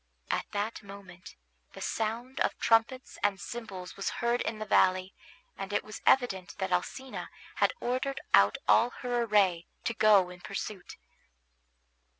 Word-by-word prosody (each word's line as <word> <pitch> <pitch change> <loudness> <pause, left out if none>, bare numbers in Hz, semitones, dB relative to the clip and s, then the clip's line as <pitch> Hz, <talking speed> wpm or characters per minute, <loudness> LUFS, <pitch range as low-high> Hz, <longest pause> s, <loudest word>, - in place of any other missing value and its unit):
At - - -1
that 210 +2 -3
moment 195 -3 -12 0.4
the - - -10
sound 230 +4 -3
of - - +1
trumpets 230 +3 +1
and 200 -2 +1
cymbals 195 -6 -7
was 195 - -2
heard 240 0 +1
in 220 - -2
the 215 - -5
valley, 185 -2 +3 0.4
and 195 0 -6
it 205 - 0
was 215 0 -9
evident 195 -9 +2
that 190 -1 -2
Alcina 255 +9 -3 0.3
had - - +3
ordered 260 +3 -2
out 100 +1 +6
all 240 - +5
her 245 -1 0
array 195 -7 +2 0.2
to 230 - -1
go 205 -5 +5
in 180 0 -12
pursuit. 195 -1 -6
210 Hz, 150 wpm, -30 LUFS, 185-235 Hz, 0.4 s, out